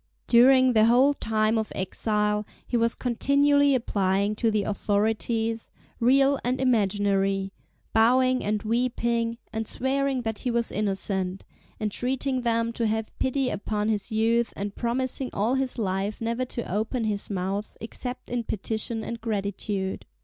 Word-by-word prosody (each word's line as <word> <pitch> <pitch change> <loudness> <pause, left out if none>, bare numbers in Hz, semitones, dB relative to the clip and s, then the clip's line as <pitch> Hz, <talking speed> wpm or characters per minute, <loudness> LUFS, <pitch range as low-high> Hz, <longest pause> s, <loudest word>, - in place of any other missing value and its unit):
During 255 +1 +6
the 220 -1 +5
whole 255 +5 +5
time 220 -3 +1
of 220 - -4
exile 210 +2 0 0.2
he - - -3
was 230 0 +2
continually 280 +3 +3
applying 200 -3 +1
to 230 - +2
the 215 -2 +1
authorities, 220 +3 -1 0.3
real 270 +3 +4
and 250 +2 0
imaginary, 195 -5 +1 0.4
bowing, 255 +3 +4
and 210 0 -1
weeping, 235 0 0 0.2
and 220 0 -3
swearing 270 0 -1
that 225 -2 -3
he 250 - -2
was 235 -1 0
innocent, 195 -2 -2 0.3
entreating 255 +5 -1
them 230 -1 0
to 230 -1 0
have 220 0 -2
pity 260 0 0
upon 210 +1 -2
his 210 -1 -1
youth, 225 +2 +1
and 200 0 -4
promising 255 +3 -2
all 215 +5 +1
his 265 -1 -1
life 195 -1 -2
never 230 +2 -1
to 240 -1 -5
open 225 +4 -1
his 210 -2 -2
mouth 195 +2 -3
except 245 +3 -6
in 245 -1 -2
petition 220 +1 -2
and 235 -1 -6
gratitude. 200 -2 -3
225 Hz, 140 wpm, -26 LUFS, 210-250 Hz, 0.4 s, During